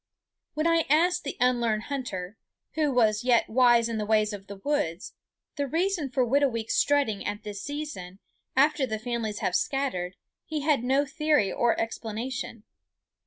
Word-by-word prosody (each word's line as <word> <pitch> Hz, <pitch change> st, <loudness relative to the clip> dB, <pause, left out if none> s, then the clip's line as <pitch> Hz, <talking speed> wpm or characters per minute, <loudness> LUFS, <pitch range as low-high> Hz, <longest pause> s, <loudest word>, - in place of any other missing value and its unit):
When 310 Hz, +1 st, -1 dB
I 330 Hz, -1 st, +3 dB
asked 355 Hz, +4 st, +3 dB
the 280 Hz, -, -4 dB
unlearned 235 Hz, -3 st, +2 dB
hunter 225 Hz, -9 st, -5 dB, 0.4 s
who 305 Hz, -2 st, +1 dB
was 220 Hz, -4 st, +2 dB
yet 245 Hz, -2 st, +3 dB
wise 240 Hz, -1 st, +4 dB
in 230 Hz, -1 st, -3 dB
the 210 Hz, -, -2 dB
ways 215 Hz, -1 st, +2 dB
of 200 Hz, -1 st, -8 dB
the 200 Hz, -, -7 dB
woods 195 Hz, -, -2 dB, 0.4 s
the 285 Hz, -1 st, -1 dB
reason 335 Hz, 0 st, 0 dB
for 255 Hz, 0 st, +1 dB
Whitooweek's 245 Hz, -3 st, +1 dB
strutting 280 Hz, -8 st, +2 dB
at 205 Hz, 0 st, -4 dB
this 205 Hz, -2 st, -6 dB
season, 285 Hz, -12 st, -6 dB, 0.4 s
after 290 Hz, 0 st, +3 dB
the 220 Hz, -2 st, -2 dB
families 225 Hz, -2 st, -3 dB
have -, -, 0 dB
scattered, 190 Hz, -11 st, -1 dB, 0.3 s
he 310 Hz, -1 st, -4 dB
had 285 Hz, -4 st, +2 dB
no 270 Hz, +3 st, +2 dB
theory 295 Hz, -7 st, +1 dB
or 235 Hz, -1 st, +1 dB
explanation. 230 Hz, +1 st, -4 dB
245 Hz, 160 wpm, -27 LUFS, 215-285 Hz, 0.4 s, wise